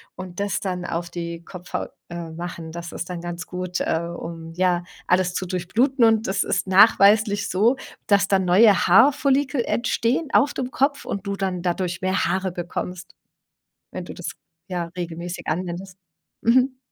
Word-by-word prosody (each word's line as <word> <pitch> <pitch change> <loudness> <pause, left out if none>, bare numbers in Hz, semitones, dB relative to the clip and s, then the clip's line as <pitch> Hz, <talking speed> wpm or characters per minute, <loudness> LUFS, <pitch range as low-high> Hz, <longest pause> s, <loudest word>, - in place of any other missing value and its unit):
und 185 -1 -8
das 200 0 -1
dann 180 -2 -3
auf 170 0 -3
die 170 -1 -6
Kopfhaut, 180 -1 -6 0.2
äh, 170 -1 -6
machen. 170 -1 -6
Das 170 0 -6
ist 175 - -6
dann 175 -2 -5
ganz 175 0 -5
gut, 180 0 -4
äh, 160 - +1 0.2
um, 165 -1 -7
ja, 180 -1 +2 0.2
alles 180 0 +2
zu 185 - -2
durchbluten. 225 +9 +1
Und 225 -1 +4
das 195 +1 +1
ist - - -1
nachweislich 205 +2 +5
so, 225 +8 +3 0.3
dass 200 -1 +4
dann 195 -1 +2
neue 195 +3 +5
Haarfollikel 270 - +4
entstehen 240 +5 0
auf 285 +1 +4
dem 255 -1 -4
Kopf 280 -1 0
und 200 0 -4
du 200 - -1
dann 185 -2 -2
dadurch 175 0 -2
mehr 185 +1 +1
Haare 190 +2 0
bekommst, 180 +1 -6 0.8
wenn 185 - -6
du - - -8
das 175 - -5 0.4
ja, 180 -3 -2
regelmäßig 175 0 -5
anwendest. 180 +3 -4 0.4
Mhm. 255 +3 +3
185 Hz, 165 wpm, -23 LUFS, 175-215 Hz, 0.8 s, nachweislich